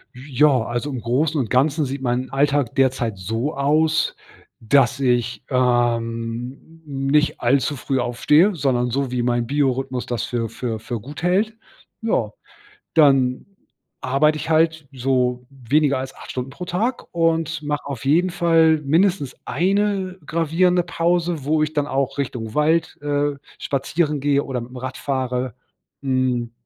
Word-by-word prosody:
Ja, 135 0 +2
also, 120 +5 -3
im 130 -3 -4
Großen 145 +7 0
und 120 -5 -1
Ganzen 145 +4 +2
sieht 135 +1 -5
mein 125 +1 -1
Alltag 140 -2 +1
derzeit 130 -5 +1
so 115 +10 -3
aus, 155 +3 +2 0.4
dass 130 +3 +3
ich, 125 -2 0
ähm, 120 +3 -1
nicht 140 +2 0
allzu 135 +4 +2
früh 135 0 -2
aufstehe. 150 - +3
Sondern 125 -5 0
so 135 +1 -1
wie 125 -1 -1
mein 120 -1 0
Biorhythmus 135 -2 0
das 120 -2 -3
für 115 -2 -2
für 115 0 -4
für 115 +1 -5
gut 140 +10 -9
hält. 205 +5 +1 0.4
Ja, 215 - 0 0.7
dann 135 -5 +4 0.6
arbeite 145 +4 +2
ich 155 - -5
halt 160 -1 +2
so 125 -1 0
weniger 140 +2 +1
als 130 0 -6
8 - - -11
Stunden 125 0 -4
pro 175 +6 -7
Tag 220 +9 -2
und 165 -1 0
mache 150 0 -3
auf 135 -4 -6
jeden 170 +6 +3
Fall 165 -2 +3
mindestens 165 -1 +1
1 195 +2 0
gravierende 170 +3 +2
Pause, 170 -3 0
wo 155 +2 +2
ich 155 - -5
dann 145 -1 0
auch 135 0 -1
Richtung 120 -5 -4
Wald, 160 +2 +1
äh, 145 0 0 0.2
spazieren 145 +2 -1
gehe 140 0 +2
oder 130 -2 -3
mitm 125 +2 -10
Rad 130 +1 -5
fahre, 130 -3 -2 0.5
mhm, 130 -3 0
140 Hz, 145 wpm, -21 LUFS, 125-155 Hz, 0.7 s, dann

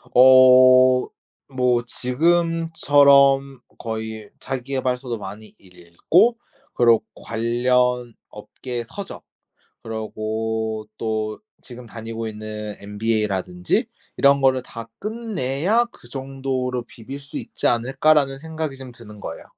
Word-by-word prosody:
어 130 0 +7 0.5
뭐 125 -2 +2
지금처럼 140 -2 +3 0.2
거의 110 -1 -6
자기계발서도 130 -2 -3
많이 105 +1 -10
읽고 95 - +1 0.4
그리고 115 -2 +4
관련 120 +1 0 0.2
업계 120 +3 -7
서적 195 +11 -9 0.6
그리고 110 0 -4
또 110 -1 -3 0.2
지금 125 -1 -11
다니고 115 0 -7
있는 105 -1 -7
MBA라든지 100 -4 -1 0.3
'이런 140 0 +4
거를 130 -1 +2
다 115 -2 -9
끝내야 210 - -1
그 120 - -17
정도로 130 -2 -4
비빌 135 +5 -10
수 140 +2 -10
있지 - - -4
않을까.'라는 135 +3 +2
생각이 160 -2 -5
좀 130 -1 -9
드는 105 -3 -13
거예요. 80 - -7
125 Hz, 230 characters per minute, -22 LUFS, 110-135 Hz, 0.6 s, 어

